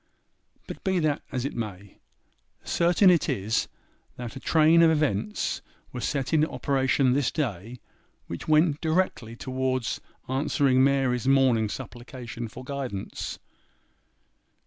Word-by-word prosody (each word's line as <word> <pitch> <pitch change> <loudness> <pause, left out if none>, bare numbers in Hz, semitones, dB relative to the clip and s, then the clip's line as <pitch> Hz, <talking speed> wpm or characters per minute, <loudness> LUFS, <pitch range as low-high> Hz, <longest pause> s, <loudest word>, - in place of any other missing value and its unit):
But - - -9
be 190 -2 +1
that 155 -4 +1
as 130 -2 -2
it 140 - -4
may, 100 -3 -6 0.6
certain 175 +3 +4
it 165 -4 +2
is, 110 -4 0 0.5
that 120 -2 -7
a - - -6
train 160 +3 +4
of 165 - +7
events 135 -10 0 0.3
were 125 - -6
set 135 +3 -2
in 155 -1 +4
operation 135 -3 +1
this 140 -1 +2
day 120 - -4 0.5
which 85 - -7
went 155 -1 +3
directly 160 -9 0
towards 130 -1 -2 0.3
answering 135 -1 +2
Mary's 135 -3 +2
morning 130 -5 +4
supplication 120 0 -7
for 125 +3 -10
guidance. 130 -7 -5
130 Hz, 125 wpm, -26 LUFS, 120-150 Hz, 0.6 s, of